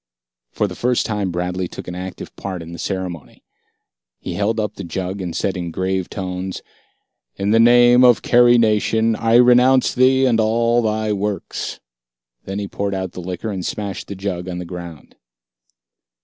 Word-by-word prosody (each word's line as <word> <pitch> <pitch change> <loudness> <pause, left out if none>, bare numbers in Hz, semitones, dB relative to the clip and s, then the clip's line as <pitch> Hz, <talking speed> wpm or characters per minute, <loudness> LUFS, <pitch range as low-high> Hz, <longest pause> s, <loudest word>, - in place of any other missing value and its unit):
For 105 - -1
the 95 - -4
first 125 +6 0
time, 105 -4 -2
Bradley 90 +1 -2
took - - -10
an 90 - -5
active 90 0 -7
part 95 -4 -6
in 85 - -10
the 85 - -8
ceremony. 90 -5 -5 0.7
He - - -6
held 110 +2 0
up 105 -2 -2
the - - -8
jug 95 +2 -4
and 85 -3 -5
said 100 - -1
in 90 -2 -4
grave 95 +2 -2
tones, 95 -1 -5 0.7
"In 100 +1 -1
the 115 - +4
name 120 +1 +6
of 125 -2 +5
Carrie 120 0 +5
Nation, 110 0 +2
I 115 +1 +1
renounce 125 +2 +5
thee 130 +1 +4
and 120 -3 +2
all 115 +2 +2
thy 110 -1 -1
works." 100 0 -4 0.7
Then 95 +1 -5
he 100 -1 -3
poured 100 0 -3
out 95 0 -3
the 90 - -8
liquor 90 +4 -5
and 95 -3 -4
smashed 100 +1 -4
the 100 - -6
jug 95 -2 -4
on 90 - -4
the 90 - -5
ground. 85 -3 -10
100 Hz, 175 wpm, -20 LUFS, 90-115 Hz, 0.7 s, name